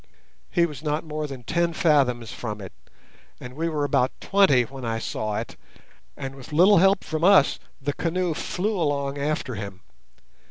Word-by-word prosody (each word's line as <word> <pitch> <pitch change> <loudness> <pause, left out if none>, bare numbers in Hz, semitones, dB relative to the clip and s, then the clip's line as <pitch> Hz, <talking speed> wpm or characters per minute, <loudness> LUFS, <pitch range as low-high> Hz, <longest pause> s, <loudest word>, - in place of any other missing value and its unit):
He 170 - +3
was 150 -4 -7
not 150 0 -1
more 155 -1 -4
than 135 -3 -8
ten 170 +6 0
fathoms 130 -8 +2
from 105 -3 -5
it, 95 -2 -8 0.7
and 125 0 -9
we 165 +4 -2
were 150 -2 -1
about 130 -2 +2
twenty 190 -11 +4
when 130 +2 -9
I 115 -1 -1
saw 110 -1 -3
it, - - -5 0.6
and 135 -2 -5
with 135 +2 -12
little 185 +6 +6
help 195 +1 +4
from 155 0 -3
us 190 -6 +5 0.2
the 145 +1 -2
canoe 175 +1 -1
flew 195 +6 -2
along 140 -3 -1
after 145 -2 -2
him. 100 -3 -7
145 Hz, 170 wpm, -24 LUFS, 125-165 Hz, 0.7 s, little